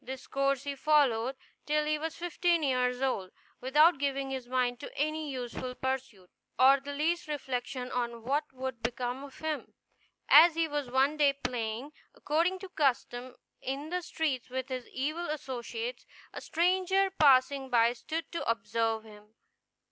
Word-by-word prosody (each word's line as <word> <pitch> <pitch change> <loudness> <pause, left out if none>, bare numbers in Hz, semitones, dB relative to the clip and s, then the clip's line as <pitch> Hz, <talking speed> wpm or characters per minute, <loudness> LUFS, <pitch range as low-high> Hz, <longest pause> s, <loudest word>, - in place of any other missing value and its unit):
This 265 0 -7
course 275 -1 0
he 285 0 -3
followed 270 -4 +2 0.3
till 300 0 +2
he 305 0 0
was 320 +1 -4
fifteen 345 -1 +1
years 250 -1 +1
old, 195 -8 -1 0.3
without 300 +5 +4
giving 275 -1 -1
his 260 -2 -4
mind 245 -1 0
to - - -8
any 310 +1 -1
useful 250 -1 -5
pursuit, 260 -9 -4 0.3
or 270 +2 +7
the 280 +2 -7
least 320 +4 0
reflection 255 -3 -4
on 235 -2 -3
what 290 +5 -1
would 260 -2 -5
become 245 +2 -3
of 280 -2 -11
him. 315 -1 -4 0.5
As 325 +2 +8
he 330 0 +1
was 290 -4 -3
one 270 +4 +2
day 285 -2 +4
playing, 245 0 -4 0.2
according 335 +5 +1
to 385 - -8
custom, 255 -5 -1 0.3
in 280 +4 -4
the 360 0 -1
street 290 -8 -2
with 260 +1 -4
his 255 -2 -5
evil 310 +6 -3
associates, 305 - -5 0.3
a - - -6
stranger 375 +3 +2
passing 270 -1 +5
by 235 -1 +4
stood 320 +7 -5
to 335 - -3
observe 225 0 0
him. 210 0 -16
270 Hz, 155 wpm, -30 LUFS, 250-305 Hz, 0.5 s, As